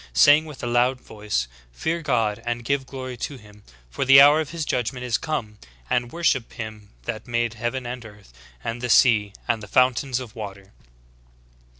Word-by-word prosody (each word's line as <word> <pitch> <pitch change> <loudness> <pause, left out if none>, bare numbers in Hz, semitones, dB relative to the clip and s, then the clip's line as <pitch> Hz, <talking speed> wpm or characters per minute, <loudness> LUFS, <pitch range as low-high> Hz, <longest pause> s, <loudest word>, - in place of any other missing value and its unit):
Saying 145 - +6
with 150 -4 -10
a - - -1
loud 120 +2 +2
voice. 105 - -3 0.2
Fear 160 - -2
God, 115 -7 0
and 120 0 -3
give 140 0 0
glory 130 -2 -6
to 140 +4 -5
him; 105 -3 -17 0.3
for - - -2
the 135 +1 +8
hour 145 +3 +7
of 155 - -5
His 165 -2 -4
judgment 125 0 -2
is 120 -2 0
come; 110 -10 -4 0.3
and 120 -1 0
worship 165 -8 0
Him 110 -2 -8
that 110 - -5
made 120 -1 0
heaven 120 +3 -3
and 120 0 -6
earth, 105 - -15 0.3
and 115 +1 -4
the 125 - -3
sea, 110 -4 +5 0.2
and 115 - 0
the 105 - -9
fountains 130 +3 +2
of 125 -3 -9
water." 100 -3 -8
120 Hz, 185 wpm, -24 LUFS, 110-130 Hz, 0.3 s, the